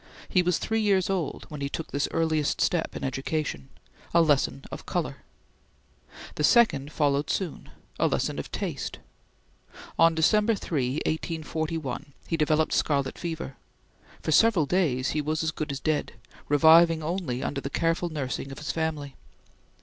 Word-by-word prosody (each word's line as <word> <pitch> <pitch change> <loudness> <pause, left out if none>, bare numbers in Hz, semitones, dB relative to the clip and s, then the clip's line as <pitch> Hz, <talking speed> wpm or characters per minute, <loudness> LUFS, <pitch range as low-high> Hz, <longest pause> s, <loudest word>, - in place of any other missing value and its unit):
He 185 - +4
was 180 -1 +1
three 225 0 -1
years 195 -3 +2
old 180 -6 -2
when 150 -2 -7
he 140 - -1
took 160 - -5
this 140 0 0
earliest 155 -2 0
step 170 -2 0
in - - -5
education; 135 - -3 0.5
a 170 - +7
lesson 135 - +1
of - - -8
color. - - -2 1.2
The 150 - -3
second 150 - +4
followed 145 -1 +1
soon; 185 -6 -3 0.3
a - - +4
lesson - - -1
of - - -6
taste. - - -4 1.0
On 165 0 +6
December 210 +7 +3
3, 135 -9 -1
1841, 155 -3 -3
he 165 - -1
developed 155 0 +2
scarlet 140 -3 0
fever. 160 -6 -5 0.7
For - - -1
several 200 -2 +5
days 140 -7 +1
he 150 - 0
was 155 +1 -1
as 160 - 0
good 155 -1 -4
as 135 - -4
dead, 155 +1 -1 0.4
reviving 160 +2 +6
only 160 -7 -2
under 140 - -2
the 140 - -4
careful 165 +3 0
nursing 135 -3 -4
of 135 - -8
his 150 - -3
family. 155 -4 -3
155 Hz, 155 wpm, -27 LUFS, 140-165 Hz, 1.2 s, a